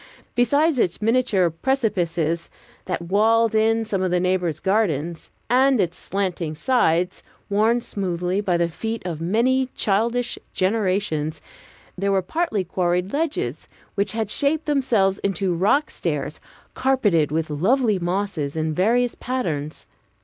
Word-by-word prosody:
Besides 285 +4 +2
its 180 - +1
miniature 220 -6 +2
precipices, 170 - -1 0.4
that 180 -2 -3
walled 220 +5 +3
in 225 +1 +2
some 200 -3 -2
of 185 - +1
the 180 0 +2
neighbors' 180 -4 0
gardens, 170 -5 -1 0.2
and 260 0 +4
its 175 -2 0
slanting 180 -5 -3
slides, 180 - +1 0.3
worn 220 +4 +3
smooth 185 -1 -2
by 180 -3 +1
the 170 0 +1
feet 225 +7 -5
of 165 -3 -4
many 250 +9 +1
childish 230 +4 0 0.2
generations, 185 -6 0 0.6
there 200 +2 -1
were 190 -1 +2
partly 270 - -1
quarried 180 +1 -1
ledges, 310 +1 -2 0.3
which 200 +1 -1
had 220 -2 -2
shaped 295 +5 +1
themselves 235 -10 +2
into 195 -2 0
rock 210 - +2
stairs, - - -3 0.3
carpeted 205 - +2
with 160 0 -1
lovely 210 - +2
mosses, 175 -5 -2
in 155 0 -1
various 235 +8 +2
patterns. 160 - -4
195 Hz, 130 wpm, -22 LUFS, 175-230 Hz, 0.6 s, and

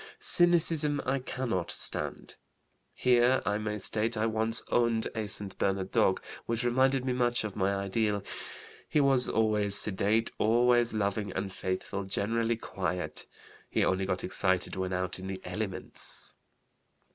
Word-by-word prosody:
Cynicism 165 -4 +4
I 135 +1 0
cannot 125 -8 -3
stand. - - -4 0.6
(Here 125 +1 +3
I 105 +1 0
may 105 0 -3
state 110 +3 -1
I 110 - 0
once 110 +1 +5
owned 115 -2 +1
a 110 -1 -3
St. 100 0 +1
Bernard 95 -1 -1
dog - - +1 0.2
which 115 +1 -2
reminded 130 +2 +1
me 130 - 0
much 120 -2 0
of 105 -3 -6
my 100 0 0
ideal. 100 +1 -1 0.7
He 150 - +1
was 135 -3 +4
always 105 -2 +2
sedate, 105 +3 +3
always 120 +1 +3
loving, 100 -1 -2
and 95 0 -4
faithful; 95 +2 -4
generally 115 +4 0
quiet. 90 -4 -5 0.4
He - - +1
only 95 0 0
got 95 -1 -2
excited 95 -1 0
when 95 0 -3
out 90 0 -2
in 95 - -7
the 95 -1 -5
elements.) 95 +1 -5
110 Hz, 145 wpm, -29 LUFS, 95-120 Hz, 0.7 s, once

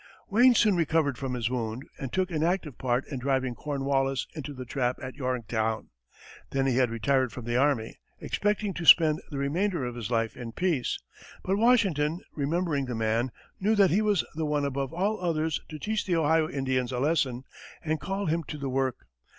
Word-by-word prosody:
Wayne 245 +4 +6
soon 215 -3 +4
recovered 155 -5 +1
from 130 -2 -3
his 120 -3 -1
wound, 120 0 -3 0.2
and 135 - -5
took 185 -1 0
an 155 -2 -1
active 165 -4 -1
part 125 0 0
in 135 -3 -4
driving 130 -1 0
Cornwallis 135 -1 -1
into 150 -2 -6
the 130 -2 -7
trap 125 0 -1
at 130 -1 -6
Yorktown. 115 -4 -2 0.6
Then 135 -1 0
he 130 -2 +1
had 130 -2 +3
retired 125 +3 +1
from 125 - -8
the 120 0 -1
army, 130 -4 +1 0.2
expecting 210 -1 -1
to 175 - -5
spend 155 -2 +7
the 145 - -5
remainder 165 +3 0
of 120 - -4
his 120 -3 -5
life 115 -2 0
in 115 -2 -7
peace; 165 -7 0 0.5
but 190 +2 0
Washington, 190 - +3
remembering 150 -1 0
the 125 -2 -4
man, 115 +3 0 0.3
knew 215 +3 +2
that 195 -5 +5
he 195 +6 +3
was 210 -5 +2
the 160 - -3
one 145 -1 0
above 135 -1 -2
all 195 +4 -1
others 160 -3 0
to 155 - -6
teach 215 +7 -2
the 180 - +2
Ohio 160 0 +3
Indians 130 -2 -1
a 125 - -2
lesson, 130 -3 +1 0.4
and 155 0 -1
called 195 -3 -2
him 165 +1 +1
to 150 - -6
the 140 -2 -3
work. 130 -1 -1
140 Hz, 195 wpm, -28 LUFS, 125-170 Hz, 0.6 s, spend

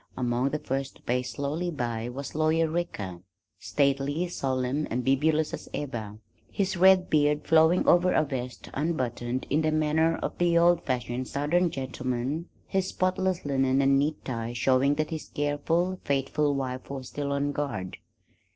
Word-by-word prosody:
Among 125 +1 +1
the 150 - -1
first 135 -1 -3
to - - -20
pace 125 +1 -1
slowly 150 +5 -2
by 120 -6 -3
was 135 +3 -6
Lawyer 160 +1 +2
Ricker, 130 - -3 0.4
stately, 140 +4 0
solemn 130 -1 -1
and 125 +1 -2
bibulous 150 +4 +2
as - - -6
ever, 110 -7 -5 0.3
his 190 0 -1
red 185 0 +5
beard 150 -1 +2
flowing 160 +2 +4
over 180 +1 +5
a 155 - +3
vest 125 -6 -6
unbuttoned 130 -5 -2
in 150 +3 +3
the 155 0 +1
manner 155 +1 +2
of - - -3
the 175 -1 +3
old 170 0 +5
fashioned 125 0 -2
southern 170 +5 +1
gentleman, 130 +3 -3 0.2
his 190 -1 -1
spotless 185 -1 0
linen 135 -1 +2
and 135 0 +4
neat 150 +2 -1
tie 115 -2 -3
showing 130 +3 +3
that 155 +1 -2
his 160 -1 -5
careful, 165 +6 0
faithful 140 +1 0
wife 130 -1 -4
was 135 -2 -6
still 145 -1 -3
on 140 0 0
guard. 135 -11 -4
145 Hz, 160 wpm, -27 LUFS, 130-160 Hz, 0.4 s, red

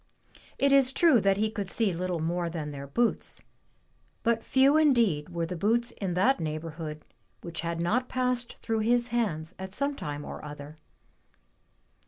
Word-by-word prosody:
It 280 0 +3
is 270 -2 +5
true 280 -5 +4
that 195 0 +3
he 215 +1 +1
could 205 -4 -4
see 215 -4 +1
little 180 +1 -2
more 170 +2 -1
than 155 -3 -5
their 140 -1 -7
boots, 235 - -1 0.8
but 230 0 +1
few 270 +2 +4
indeed 235 - +3
were 170 -1 -2
the 180 - -5
boots 235 +7 +1
in 190 -6 -4
that 225 +6 +3
neighborhood 155 -1 -5 0.4
which 170 -1 -5
had 170 0 -3
not 230 +10 0
passed 250 -1 -1
through 225 -1 -2
his 240 +2 +2
hands 185 -9 -1
at 190 0 -6
some 280 0 -1
time 145 - -5
or - - -8
other. 150 +1 -9
195 Hz, 165 wpm, -28 LUFS, 165-240 Hz, 0.8 s, is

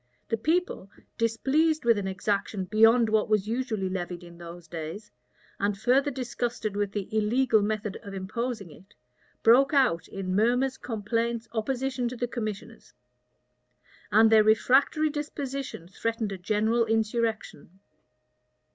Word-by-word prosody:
The 225 - 0
people, 320 - -1 0.3
displeased 285 +7 +1
with 230 -1 +5
an 195 - -3
exaction 195 +1 -2
beyond 225 +4 +5
what 215 -1 +1
was 210 -2 +1
usually 225 -4 -2
levied 180 -1 -4
in 170 0 -13
those 170 0 -10
days, 170 +6 -7 0.5
and 200 0 0
further 260 +6 +2
disgusted 240 -5 -3
with 205 -1 -1
the 200 -2 -4
illegal 220 +1 +3
method 210 -1 -2
of 200 -1 -8
imposing 205 0 -4
it, 190 +6 -18 0.5
broke 270 +6 +5
out 255 -12 +2
in 185 -1 -4
murmurs, 245 +5 +1
complaints, 230 +1 -2
opposition 255 +2 -2
to 245 - -5
the 245 0 -2
commissioners; 220 -1 -6 1.2
and 220 +2 +6
their 220 -1 +7
refractory 270 +8 +3
disposition 275 - -5
threatened 225 +2 -3
a 195 - -4
general 220 +5 +1
insurrection. 220 -5 -2
220 Hz, 130 wpm, -27 LUFS, 200-245 Hz, 1.2 s, their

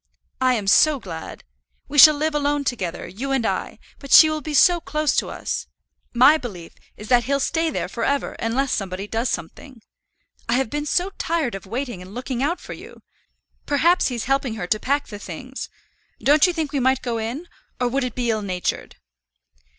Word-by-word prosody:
I 255 -1 +3
am 210 -4 -3
so 290 +8 +4
glad. 165 -7 -8 0.4
We 290 +1 +1
shall 305 +2 +10
live 310 +2 -1
alone 290 0 0
together, 190 -10 -3
you 245 +10 -5
and 265 -4 0
I; - - -2 0.2
but 275 -2 -11
she 315 -1 +9
will 310 0 -3
be 300 +1 -4
so 350 +3 +5
close 305 -1 -1
to - - 0
us! - - -4 0.4
My 260 +6 +6
belief 185 - -8 0.2
is 210 - -10
that 240 -2 +4
he'll 280 +2 0
stay 325 +4 0
there - - -3
for 230 - -5
ever 280 +3 0
unless 255 +4 -1
somebody 195 -1 -3
does 230 +3 -1
something. 245 - -6 0.7
I - - +2
have 265 -3 0
been 295 0 -3
so 360 +6 0
tired 320 -7 -1
of 195 -1 -8
waiting 240 -3 -4
and 185 +3 -12
looking 250 0 -4
out 320 +6 0
for - - -9
you. - - -13 0.6
Perhaps 335 +5 +3
he's 240 -3 -3
helping 270 -3 0
her 205 - -4
to 215 +4 0
pack 280 +5 0
the 205 -3 -9
things. 250 +9 -8 0.5
Don't 295 +5 +4
you - - +1
think 315 -4 -3
we 280 - +1
might 260 0 +1
go 235 -2 -2
in; 245 +10 -5 0.3
or 250 - +1
would 265 +2 -1
it 250 -3 -4
be 240 -2 0
ill 215 -1 -1
natured?" 185 -3 -3
260 Hz, 200 wpm, -22 LUFS, 225-290 Hz, 0.7 s, shall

